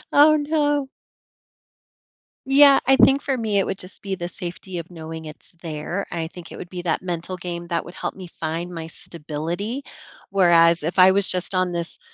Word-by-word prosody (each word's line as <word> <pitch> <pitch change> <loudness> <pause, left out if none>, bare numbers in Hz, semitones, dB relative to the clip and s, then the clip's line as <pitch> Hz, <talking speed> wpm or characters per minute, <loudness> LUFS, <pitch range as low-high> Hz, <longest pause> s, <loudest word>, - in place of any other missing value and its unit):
Oh, 300 +2 +7
no. 290 -2 +1 1.6
Yeah, 275 +1 +7
I 270 +1 +5
think 275 +1 +5
for 270 -2 -1
me 220 -3 0
it 195 - +3
would 195 - -3
just 185 - -10
be 195 -1 -3
the 175 -2 -4
safety 180 +1 -6
of 170 +1 -9
knowing 160 -1 -8
it's 155 0 -11
there 165 +4 -4
and 170 - -3
I 160 - -2
think 175 0 -12
it - - -8
would 175 - -8
be 180 -1 -6
that 170 -3 -1
mental 180 0 -4
game 175 -1 -6
that 170 -1 -2
would 175 - -10
help - - -4
me 185 -2 -9
find 165 +2 -4
my 165 -1 -6
stability, 170 - -5 0.4
whereas 170 -4 +5
if 170 +4 -1
I 185 +1 +8
was 200 0 +2
just 185 +1 -2
on 185 -1 +1
this, 170 -1 -4
180 Hz, 200 wpm, -23 LUFS, 170-200 Hz, 1.6 s, I